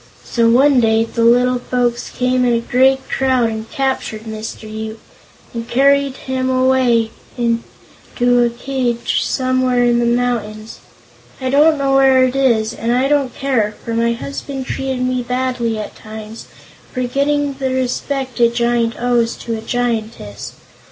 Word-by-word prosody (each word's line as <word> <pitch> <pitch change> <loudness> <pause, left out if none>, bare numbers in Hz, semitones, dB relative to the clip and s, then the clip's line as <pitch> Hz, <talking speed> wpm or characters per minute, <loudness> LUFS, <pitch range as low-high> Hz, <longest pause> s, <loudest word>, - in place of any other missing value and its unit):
So 230 -1 +1
one 265 +3 +5
day 225 -1 +3
the 230 0 -2
little 245 +2 +4
folks 245 -1 -1
came 250 0 0
in 245 -1 +2
a 230 - +2
great 265 +3 +2
crowd 255 -3 +1
and 220 0 -6
captured 265 -6 -2
Mr. 220 0 -7
Yoop, 220 +1 -6 0.5
and 230 0 -6
carried 275 +1 +3
him 260 0 -1
away 255 -3 +2 0.3
to 240 +1 -1
a 240 - +2
cage 240 -1 -2
somewhere 255 -1 +1
in 240 0 +3
the 235 - +1
mountains. 230 -3 -2 0.6
I 260 -1 -2
don't 305 +3 +4
know 275 -1 0
where 265 -1 +5
it 255 0 0
is, 235 -5 +2
and 230 +1 -2
I 255 +2 +2
don't 280 -3 0
care, 235 -7 0
for 230 - -3
my 235 +1 +1
husband 270 +2 -6
treated 265 -1 -3
me 255 0 0
badly 250 -2 -2
at 215 - -6
times, 220 0 -10 0.4
forgetting 280 +2 -1
the 265 -1 -1
respect 260 0 -2
a 235 -1 +5
giant 235 -1 0
owes 240 -1 +1
to 230 - -5
a 220 - -6
giantess. 225 - -3
245 Hz, 150 wpm, -17 LUFS, 230-260 Hz, 0.6 s, one